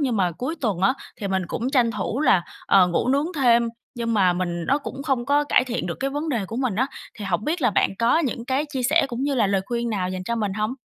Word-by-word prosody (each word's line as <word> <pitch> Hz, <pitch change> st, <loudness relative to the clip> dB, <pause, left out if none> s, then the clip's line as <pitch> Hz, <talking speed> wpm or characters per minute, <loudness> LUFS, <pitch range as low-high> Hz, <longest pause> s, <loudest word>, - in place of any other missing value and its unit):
nhưng 255 Hz, -6 st, 0 dB
mà 180 Hz, -3 st, +2 dB
cuối 260 Hz, -, -4 dB
tuần 205 Hz, -8 st, -1 dB
á, 195 Hz, +7 st, +3 dB, 0.2 s
thì 200 Hz, -3 st, -4 dB
mình 190 Hz, 0 st, 0 dB
cũng 250 Hz, +7 st, -3 dB
tranh 245 Hz, -4 st, +3 dB
thủ 215 Hz, +5 st, -3 dB
là, 190 Hz, -, +4 dB, 0.2 s
ờ, 190 Hz, -2 st, +6 dB
ngủ 175 Hz, +7 st, 0 dB
nướng 280 Hz, +4 st, +2 dB
thêm. 235 Hz, -4 st, +4 dB, 0.3 s
Nhưng 230 Hz, -1 st, -2 dB
mà 185 Hz, -3 st, +4 dB
mình 175 Hz, -1 st, -2 dB
nó 280 Hz, +2 st, +2 dB
cũng 275 Hz, -1 st, -7 dB
không 270 Hz, -4 st, -1 dB
có 290 Hz, +1 st, +3 dB
cải 255 Hz, -, +3 dB
thiện 245 Hz, -5 st, -3 dB
được 170 Hz, -, -3 dB
cái 275 Hz, +1 st, 0 dB
vấn 295 Hz, +3 st, -3 dB
đề 230 Hz, -8 st, -1 dB
của 225 Hz, -, -6 dB
mình 255 Hz, -6 st, 0 dB
á. 260 Hz, -, +2 dB, 0.3 s
Thì 205 Hz, -, -5 dB
hổng 190 Hz, +2 st, -1 dB
biết 320 Hz, 0 st, -1 dB
là 240 Hz, -, +4 dB
bạn -, -, +2 dB
có 235 Hz, +7 st, +3 dB
những 260 Hz, -7 st, -2 dB
cái 270 Hz, +3 st, 0 dB
chia 260 Hz, -3 st, -2 dB
sẻ 310 Hz, +6 st, +3 dB
cũng 240 Hz, +1 st, -4 dB
như 280 Hz, 0 st, 0 dB
là 230 Hz, -5 st, +3 dB
lời 195 Hz, -1 st, +1 dB
khuyên 235 Hz, -1 st, -2 dB
nào 185 Hz, -4 st, -1 dB
dành 185 Hz, 0 st, -4 dB
cho 235 Hz, -, -2 dB
mình 210 Hz, -3 st, -1 dB
hông? 215 Hz, +5 st, -2 dB
235 Hz, 280 wpm, -23 LUFS, 200-270 Hz, 0.3 s, ờ